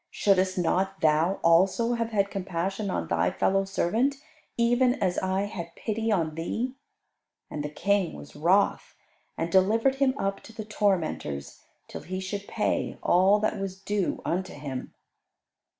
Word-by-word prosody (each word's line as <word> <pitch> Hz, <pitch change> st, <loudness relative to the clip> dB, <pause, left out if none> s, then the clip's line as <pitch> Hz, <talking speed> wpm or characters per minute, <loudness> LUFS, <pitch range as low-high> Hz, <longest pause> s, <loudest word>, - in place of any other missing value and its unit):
Shouldest 190 Hz, -2 st, +2 dB
not 190 Hz, +2 st, 0 dB
thou 160 Hz, +4 st, +3 dB
also 190 Hz, +8 st, +4 dB
have 230 Hz, -1 st, -1 dB
had 200 Hz, -3 st, 0 dB
compassion 195 Hz, +2 st, -3 dB
on -, -, -2 dB
thy -, -, +1 dB
fellow 195 Hz, +1 st, +1 dB
servant, 225 Hz, +8 st, +1 dB, 0.4 s
even 245 Hz, +2 st, +3 dB
as 180 Hz, -1 st, 0 dB
I 190 Hz, +1 st, 0 dB
had 170 Hz, -5 st, -6 dB
pity 225 Hz, 0 st, -2 dB
on 165 Hz, -6 st, +1 dB
thee?" 225 Hz, +10 st, -3 dB, 0.8 s
And 150 Hz, -, -4 dB
the 150 Hz, -, -3 dB
King 195 Hz, +3 st, 0 dB
was -, -, -11 dB
wroth, 180 Hz, +7 st, +2 dB, 0.4 s
and 165 Hz, +1 st, -2 dB
delivered 225 Hz, +8 st, +3 dB
him 270 Hz, -1 st, +2 dB
up 195 Hz, -4 st, -2 dB
to 225 Hz, -, -14 dB
the 220 Hz, -1 st, -6 dB
tormentors, 165 Hz, -, -1 dB, 0.3 s
till -, -, -8 dB
he 185 Hz, +1 st, -5 dB
should 200 Hz, +2 st, -5 dB
pay -, -, -1 dB
all 190 Hz, +3 st, +5 dB
that 215 Hz, -1 st, 0 dB
was 195 Hz, -1 st, -5 dB
due 200 Hz, -1 st, -2 dB
unto 185 Hz, +2 st, -2 dB
him. 140 Hz, -3 st, -6 dB
195 Hz, 150 wpm, -27 LUFS, 175-215 Hz, 0.8 s, all